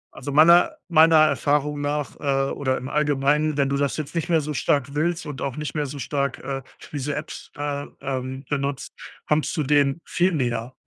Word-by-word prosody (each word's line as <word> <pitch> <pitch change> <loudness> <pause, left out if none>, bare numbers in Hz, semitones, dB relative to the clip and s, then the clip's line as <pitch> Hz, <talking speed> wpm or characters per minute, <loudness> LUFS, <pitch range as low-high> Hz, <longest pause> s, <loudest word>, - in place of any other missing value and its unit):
Also 140 +2 -6
meiner 170 +4 +6
meiner 165 -1 +6
Erfahrung 150 -1 +2
nach, 145 0 -2
äh, 135 -1 0
oder 130 -2 -1
im 130 - -6
Allgemeinen, 150 +1 +1
wenn 140 -1 +2
du 140 - 0
das 140 -1 0
jetzt 155 -2 -5
nicht 170 +1 -2
mehr 165 -2 +3
so 150 +1 -4
stark 140 0 0
willst 165 +3 -1
und 145 -2 -7
auch 135 -1 -3
nicht 150 -1 -4
mehr 150 -2 -1
so 145 - -7
stark, 140 0 -2
äh, 135 -1 -5 0.3
wie 145 - -4
so 145 +3 -2
Apps, 150 +2 -7
äh, 145 -1 -3
ähm, 130 0 -4
benutzt, 140 -1 -3 0.4
kommst 150 +2 0
du 155 - +1
dem 145 +1 +2
viel 180 +2 +1
näher. 120 -4 -2
145 Hz, 200 wpm, -23 LUFS, 135-150 Hz, 0.4 s, meiner